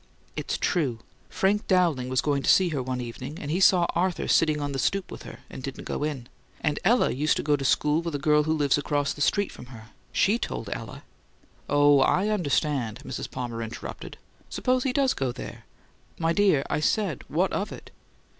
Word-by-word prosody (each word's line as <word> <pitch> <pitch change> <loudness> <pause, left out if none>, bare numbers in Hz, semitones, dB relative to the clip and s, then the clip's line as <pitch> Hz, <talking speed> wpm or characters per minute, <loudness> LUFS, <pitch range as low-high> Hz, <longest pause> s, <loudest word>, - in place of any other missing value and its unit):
"It's - - -2
true. 140 -10 0 0.3
Frank 205 +2 0
Dowling 170 -9 +2
was 130 -1 +2
going 145 -2 0
to - - 0
see 185 -2 +5
her 145 -5 -2
one 125 0 -3
evening 125 +5 -7
and 145 - -5
he 175 - +1
saw 185 -2 +5
Arthur 180 +1 0
sitting 155 -2 +3
on 145 -1 -3
the 135 - -3
stoop 195 +8 -1
with - - -8
her, - - -11
and - - -9
didn't 135 0 -6
go - - -3
in. 140 -5 -3 0.3
And 150 -2 -1
Ella 240 +2 +3
used 150 +4 +1
to - - -2
go 150 0 +3
to 140 - -4
school 150 +3 +2
with 170 -3 -4
a - - +1
girl 150 +1 +3
who 155 - +1
lives 145 -2 +2
across 145 -1 0
the 145 - -9
street 200 +7 +1
from 125 - -11
here. 115 -2 -12 0.2
She 215 +4 +2
told - - -4
Ella - - -8 0.3
" - - -33
"Oh, 145 -1 +5
I 185 +9 +3
understand," 145 - 0
Mrs. - - -5
Palmer 120 -2 -5
interrupted. 110 0 -7 0.3
"Suppose 255 0 0
he 265 - +2
does 270 0 +2
go 135 -2 -2
there. - - -9 0.5
My 165 0 +1
dear, 190 -8 +3
I - - -1
said, 175 - 0
'What 175 +6 0
of 200 - -2
it?'" - - -10
150 Hz, 210 wpm, -26 LUFS, 135-180 Hz, 0.5 s, see